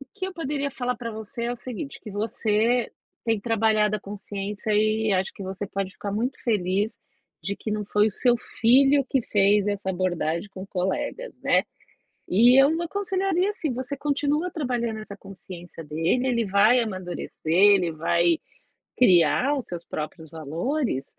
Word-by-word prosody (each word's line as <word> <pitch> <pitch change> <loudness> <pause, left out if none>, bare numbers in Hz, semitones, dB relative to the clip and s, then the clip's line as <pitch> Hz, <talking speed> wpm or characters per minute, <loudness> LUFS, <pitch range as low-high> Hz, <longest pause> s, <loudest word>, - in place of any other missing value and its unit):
O - - -10
que 385 -3 -4
eu 380 - -6
poderia 285 -4 -2
falar 250 -2 -2
pra 235 -1 -5
você 220 +2 -6
é 240 - -1
o - - -5
seguinte: 255 +3 -7
que 215 - -9
você 220 +3 0 0.3
tem 225 -3 +1
trabalhado 215 -1 +2
a - - -10
consciência 205 +1 -5
e 215 0 +2
acho 190 0 0
que - - -9
você 190 +1 -5
pode 195 -1 -4
ficar 200 0 -5
muito 245 +5 -2
feliz 205 -1 0 0.5
de 200 +5 -3
que 220 - -5
não 210 0 -2
foi 210 +1 +2
o - - -5
seu 245 +4 +2 0.2
filho 270 +4 +5
que 270 - +2
fez 205 -1 +3
essa 200 -2 -1
abordagem 175 -1 -1
com 195 -1 -9
colegas, 190 - -3
né. - - +3 0.7
E 240 +7 +6
eu 275 - +5
n 330 +2 -1
aconselharia 385 0 0
assim: 335 -8 -3
você 260 +3 -4
continua 295 +4 0
trabalhando 245 -7 -2
essa 210 -2 -8
consciência 180 -4 -11
dele, 165 - 0
ele 235 -3 +1
vai 205 +5 +4
amadurecer, 185 -5 -5 0.2
ele 190 -1 +5
vai 170 +1 +2 0.6
criar 250 - +4
os 260 - -5
seus 175 -1 -6
próprios 155 +1 -6
valores, 165 - -2
215 Hz, 165 wpm, -25 LUFS, 190-255 Hz, 0.7 s, E